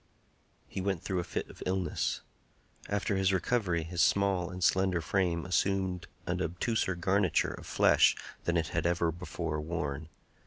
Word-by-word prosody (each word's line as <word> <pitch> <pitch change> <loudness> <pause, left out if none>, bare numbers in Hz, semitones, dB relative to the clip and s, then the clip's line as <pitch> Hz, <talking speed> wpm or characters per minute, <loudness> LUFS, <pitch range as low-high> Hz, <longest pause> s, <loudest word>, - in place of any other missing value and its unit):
He 95 - -4
went 95 -3 -1
through 95 -2 -1
a - - -1
fit 90 - -4
of - - -16
illness. 90 -3 -1 0.7
After 100 -1 0
his 95 0 +3
recovery 95 -3 +1
his 85 +2 -2
small 95 -3 +3
and 90 0 -5
slender 95 -1 +3
frame 85 0 0
assumed 95 -1 0 0.2
an - - -1
obtuser 95 +2 0
garniture 95 0 +2
of - - -10
flesh - - +5 0.3
than 85 0 +2
it 80 -1 0
had 85 -1 0
ever 85 -1 +1
before 85 -2 -4
worn. 80 -2 -3
90 Hz, 155 wpm, -31 LUFS, 85-95 Hz, 0.7 s, flesh